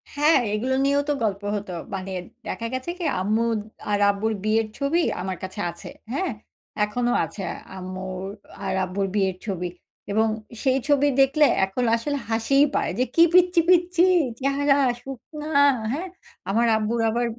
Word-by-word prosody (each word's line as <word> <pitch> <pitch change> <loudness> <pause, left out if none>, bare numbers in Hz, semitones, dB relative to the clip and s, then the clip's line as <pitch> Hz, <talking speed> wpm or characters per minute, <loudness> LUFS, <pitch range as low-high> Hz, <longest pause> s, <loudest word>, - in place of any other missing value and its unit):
হ্যাঁ, 295 +1 +5
এগুলো 245 +5 0
নিয়েও 280 +1 +3
তো - - +3
গল্প 200 -2 -1
হত। 205 -1 -5 0.3
মানে 190 0 -5 0.4
দেখা 230 - -4
গেছে 260 +5 -3
কি, 350 - -3 0.2
আম্মু 215 +4 +1 0.5
আর 205 - +2
আব্বুর 215 +2 -1
বিয়ের 220 +1 +2
ছবি 290 +5 +1 0.2
আমার 185 0 -3
কাছে 190 +2 -6
আছে। 170 - -10 0.2
হ্যাঁ, 360 +6 -1 0.5
এখনো 240 +4 0
আছে 165 +5 -8 0.3
আম্মুর 185 0 -6 0.4
আর 190 - -1
আব্বুর 195 +2 -2
বিয়ের 190 -3 +1
ছবি 180 -4 -3 0.4
এবং 220 +2 +3 0.4
সেই 265 -1 +3
ছবি 290 -1 +4
দেখলে 275 +3 +5 0.2
এখন 195 +6 -3
আসলে 285 +5 -2
হাসি 225 +4 +1 0.2
পায় - - +1
যে, - - +4
কি 335 - +7
পচ্ছি, 360 -1 +5
পচ্ছি 355 -1 +4 0.4
চেহারা 275 +1 +2 0.3
শুকনা 295 +3 -8 0.4
হ্যাঁ, 340 +8 -3 0.4
আমার 230 +4 +2
আব্বুর 220 +2 -1
আবার 240 +2 0
230 Hz, 150 wpm, -24 LUFS, 200-285 Hz, 0.5 s, কি